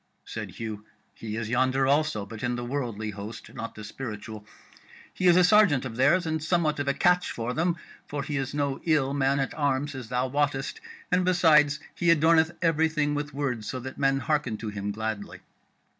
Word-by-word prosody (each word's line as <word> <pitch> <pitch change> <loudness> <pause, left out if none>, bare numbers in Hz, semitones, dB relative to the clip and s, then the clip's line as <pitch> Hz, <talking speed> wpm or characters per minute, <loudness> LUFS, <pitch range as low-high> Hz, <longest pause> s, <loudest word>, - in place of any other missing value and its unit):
Said - - -6
Hugh: 110 -2 -6 0.3
"He 110 -1 -6
is 115 -2 -3
yonder 130 +3 +2
also, 140 -6 +1
but 105 +1 -9
in 125 0 -1
the 120 0 -4
worldly 120 -5 -3
host, 105 +3 -9
not 115 -1 -6
the 110 - -8
spiritual: 105 -2 -7 0.7
he 185 - +1
is 175 0 +7
a 180 - +6
sergeant 180 -9 +5
of 115 -3 -5
theirs, 145 +9 +3
and 160 -1 -2
somewhat 155 -3 +1
of 145 - -2
a 140 - +3
catch 180 0 +3
for 120 +1 -3
them, 170 +3 0 0.3
for 145 -1 -3
he 145 +1 -4
is 135 0 -2
no 140 -2 -2
ill 145 -4 +2
man 140 0 +2
at 135 - -1
arms, 145 -1 0
as 130 -4 -7
thou 125 0 0
wottest, 140 0 -1 0.3
and 180 0 +3
besides 160 -5 +4
he 175 - 0
adorneth 160 0 +4
everything 160 -2 +2
with 145 0 -3
words, 130 -7 -3
so 130 - -3
that 130 +1 -8
men 135 -1 +3
hearken 145 -8 0
to 110 - -5
him 105 0 -4
gladly." 110 -1 -5
135 Hz, 195 wpm, -27 LUFS, 115-155 Hz, 0.7 s, is